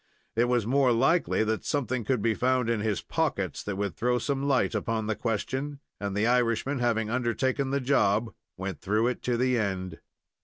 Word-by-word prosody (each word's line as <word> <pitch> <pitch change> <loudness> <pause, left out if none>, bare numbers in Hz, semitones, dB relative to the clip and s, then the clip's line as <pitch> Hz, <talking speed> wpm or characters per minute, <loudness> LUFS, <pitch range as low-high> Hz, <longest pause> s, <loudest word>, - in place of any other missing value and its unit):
It 115 +2 +3
was 120 -3 +1
more 130 +1 +3
likely 135 +2 +2
that 110 0 -1
something 130 -4 -1
would 125 -6 +1
be 115 -1 +3
found 125 0 +1
in 115 - 0
his 105 -2 -1
pockets - - -1
that 100 - -4
would 100 -1 -2
throw 125 +1 +1
some 140 +2 -1
light 135 -3 +2
upon 110 +1 -1
the 110 0 -1
question; 130 +6 -3 0.2
and 100 -1 -3
the 105 - +2
Irishman, 125 +3 +1
having 115 -2 0
undertaken 130 +2 0
the 140 +1 +1
job, 110 -4 +2 0.2
went 95 0 -5
through 105 +5 +1
it 125 - -4
to 120 -1 0
the 125 0 +2
end. 95 -4 -3
120 Hz, 190 wpm, -28 LUFS, 110-130 Hz, 0.2 s, It